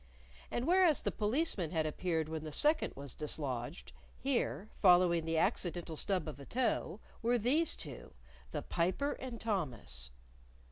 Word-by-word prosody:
And 240 - -1
whereas 355 -2 +5
the - - 0
Policeman 215 - 0
had 160 -1 0
appeared 160 0 -1
when 160 -1 -4
the 155 - -5
second 305 - +2
was 140 -3 -6
dislodged, 145 -1 -4 0.3
here, 215 - -1
following 175 -3 +6
the 165 0 0
accidental 175 -3 0
stub 185 +2 0
of 145 -3 -6
a 140 - -9
toe, 240 -4 0 0.2
were 240 +2 +3
these 280 +9 +2
two 140 -7 -8 0.4
the - - -3
Piper 190 +12 0
and 250 -3 -6
Thomas. 120 - -3
175 Hz, 145 wpm, -34 LUFS, 155-240 Hz, 0.4 s, following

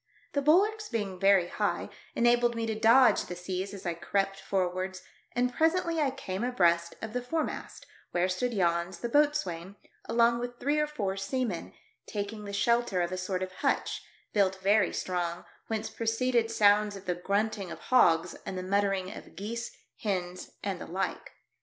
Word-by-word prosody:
The 280 - +1
bulwarks 415 +9 +3
being 200 -5 -3
very 195 -2 +5
high, - - -2 0.2
enabled 240 0 +3
me 230 0 -1
to 225 - -1
dodge 230 +4 +5
the 180 - -6
seas 185 +2 -4
as 200 -2 -9
I 175 - 0
crept 195 +3 -1
forwards, 185 0 -2 0.3
and 250 0 +1
presently 330 +3 +2
I 285 - +3
came 200 -6 -4
abreast 170 -8 +2
of 220 -1 -5
the 250 - -1
foremast, 315 +6 -3 0.2
where 175 +1 +1
stood 190 +7 -1
Jans, 170 -2 +1
the 235 - -4
boatswain, 200 - +1 0.3
along 235 0 +3
with 245 0 -5
three 290 +3 +1
or 300 - +2
four 200 -10 -3
seamen, 195 -1 -2 0.3
taking 210 0 -4
the 200 - -5
shelter 220 -2 +2
of 175 - -3
a - - -1
sort 185 0 -2
of 185 - -5
hutch, - - -1 0.3
built 195 -2 +3
very 200 0 +4
strong, 175 -1 -2 0.2
whence 220 -1 -3
pro 230 - -5
ceeded 235 0 +2
sounds 210 -1 +4
of 195 0 -10
the 180 - 0
grunting 200 +2 -1
of - - -6
hogs, 170 -9 +3
and 185 - -5
the 185 - -3
muttering 195 -1 0
of - - -12
geese, 230 +6 -4 0.3
hens 185 -3 -3
and 195 -3 -3
the - - -6
like. 185 +3 -3
200 Hz, 175 wpm, -29 LUFS, 185-240 Hz, 0.3 s, very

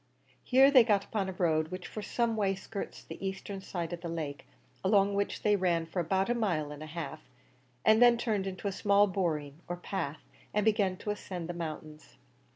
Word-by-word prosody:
Here 265 +2 +6
they 260 -4 +8
got 205 -3 +2
upon 200 -4 -2
a - - -4
road 160 -4 +1
which 185 +2 -7
for 215 - -6
some 235 +1 0
way 195 -3 +1
skirts 200 +1 -7
the - - -9
eastern 195 0 -4
side 175 -3 -4
of 170 - -6
the 170 - -5
lake, 155 -4 -5 0.4
along 200 0 +4
which 200 0 -1
they 210 -1 +4
ran 175 -4 +1
for 165 +3 -4
about 190 +3 +1
a 240 - +2
mile 175 -11 0
and 150 0 -8
a 155 - -6
half, 155 -1 -6 0.6
and 220 +1 +6
then 240 -1 +7
turned 215 -5 -1
into 190 +1 -4
a - - 0
small 200 +1 +4
boreen 160 -6 -2
or 175 - -3
path, 160 -5 -4 0.3
and 210 -1 +2
began 205 -4 +2
to 210 - -3
ascend 180 -4 -5
the 175 - -4
mountains. 155 -2 -7
190 Hz, 205 wpm, -31 LUFS, 165-205 Hz, 0.6 s, they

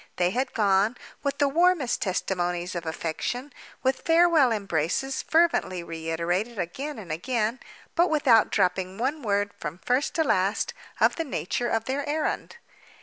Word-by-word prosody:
They 180 0 +1
had 255 +5 -2
gone—with 215 +7 0
the 285 - +3
warmest 330 -3 +2
testimonies 180 -2 -1
of 170 -2 -5
affection, 245 - -3 0.3
with 260 0 +1
farewell 330 -5 +4
embraces 200 - -1
fervently 315 - +2
reiterated 170 +7 -2
again 265 - -4
and 190 -7 -8
again—but 240 - -1
without 260 -8 +4
dropping 185 -1 0
one 275 +6 -1
word, 205 -3 0
from 150 +1 -5
first 255 +3 +1
to 320 - +3
last, 195 -6 +1 0.3
of - - +3
the 330 - 0
nature 245 -4 -2
of 225 0 0
their 275 +2 -1
errand. 310 +9 -2
225 Hz, 140 wpm, -26 LUFS, 180-280 Hz, 0.3 s, farewell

